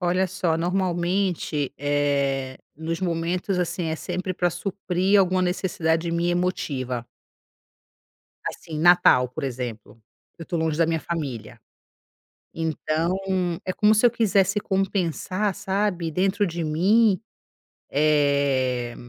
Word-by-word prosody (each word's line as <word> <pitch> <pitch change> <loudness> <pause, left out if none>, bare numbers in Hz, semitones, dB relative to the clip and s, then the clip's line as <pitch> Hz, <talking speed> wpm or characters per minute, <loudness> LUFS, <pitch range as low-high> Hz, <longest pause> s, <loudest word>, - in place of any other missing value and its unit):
Olha 180 +1 +1
só, 175 -3 -1
normalmente, 175 -4 -1
eh, 140 -2 0 0.2
nos 165 +2 -4
momentos 180 +2 -1
assim, 175 0 -1
é 160 0 -2
sempre 185 +2 -4
pra 175 0 +1
suprir 190 +2 0
alguma 185 -1 +3
necessidade 170 -2 0
minha 170 +1 0
emotiva. 130 -9 -2 1.4
Assim, 155 -2 -5
Natal, 175 -7 +5
por 140 +4 -6
exemplo, 120 -4 -6 0.4
eu 165 - -7
tô 170 +1 -3
longe 160 -2 0
da 165 - +4
minha 165 -1 0
família, 125 -10 -5 0.9
então 160 +2 -1 0.5
é 185 - -2
como 210 +1 +4
se 220 - +4
eu 235 - +6
quisesse 200 -3 +2
compensar, 190 0 -1
sabe, 190 -4 -1
dentro 195 +4 +1
de 170 0 -3
mim, 190 +7 +3 0.7
eh, 140 -4 +1
170 Hz, 115 wpm, -24 LUFS, 150-185 Hz, 1.4 s, eu